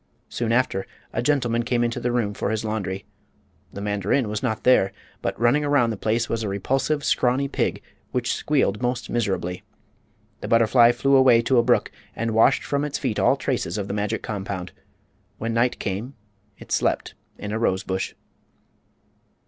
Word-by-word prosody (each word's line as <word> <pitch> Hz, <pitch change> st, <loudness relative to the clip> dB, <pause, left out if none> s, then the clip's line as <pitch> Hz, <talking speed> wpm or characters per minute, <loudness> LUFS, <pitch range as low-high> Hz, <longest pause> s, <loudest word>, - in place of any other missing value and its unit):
Soon 115 Hz, -1 st, -2 dB
after 115 Hz, -5 st, +1 dB, 0.3 s
a 115 Hz, -, 0 dB
gentleman 120 Hz, -4 st, +1 dB
came 120 Hz, 0 st, 0 dB
into 120 Hz, 0 st, -1 dB
the 120 Hz, -, -1 dB
room 115 Hz, -4 st, 0 dB
for 100 Hz, -, -2 dB
his 110 Hz, 0 st, -2 dB
laundry. 100 Hz, -3 st, -3 dB, 0.7 s
The 100 Hz, -, -7 dB
mandarin 105 Hz, +4 st, 0 dB
was 105 Hz, -1 st, -3 dB
not 110 Hz, -4 st, -2 dB
there, 125 Hz, -6 st, +4 dB, 0.3 s
but -, -, -3 dB
running 120 Hz, +6 st, +3 dB
around 140 Hz, -5 st, +2 dB
the -, -, -3 dB
place 115 Hz, +3 st, 0 dB
was 115 Hz, -, -2 dB
a 105 Hz, -, -2 dB
repulsive, 135 Hz, +9 st, 0 dB
scrawny 130 Hz, +3 st, +2 dB
pig, -, -, -2 dB, 0.3 s
which -, -, 0 dB
squealed 130 Hz, -8 st, 0 dB
most 125 Hz, 0 st, -2 dB
miserably. 95 Hz, -6 st, -1 dB, 0.8 s
The -, -, -6 dB
butterfly 115 Hz, +1 st, +5 dB
flew 135 Hz, +3 st, +2 dB
away 125 Hz, -3 st, +6 dB
to 125 Hz, +1 st, +3 dB
a -, -, +4 dB
brook 120 Hz, 0 st, +2 dB, 0.2 s
and 115 Hz, 0 st, -2 dB
washed 110 Hz, +1 st, +4 dB
from 140 Hz, 0 st, -1 dB
its 150 Hz, -1 st, -2 dB
feet 125 Hz, -6 st, -2 dB
all -, -, +4 dB
traces 85 Hz, -, -2 dB
of 100 Hz, -1 st, -3 dB
the 100 Hz, -, -3 dB
magic 105 Hz, 0 st, -2 dB
compound. 95 Hz, -3 st, -4 dB, 0.7 s
When 115 Hz, +1 st, -3 dB
night 120 Hz, +1 st, +1 dB
came 105 Hz, +8 st, -4 dB, 0.4 s
it -, -, -13 dB
slept -, -, 0 dB, 0.2 s
in 105 Hz, -, -6 dB
a 110 Hz, -, -1 dB
rose 95 Hz, -4 st, +1 dB
bush. 95 Hz, 0 st, -3 dB
115 Hz, 175 wpm, -24 LUFS, 105-125 Hz, 0.8 s, away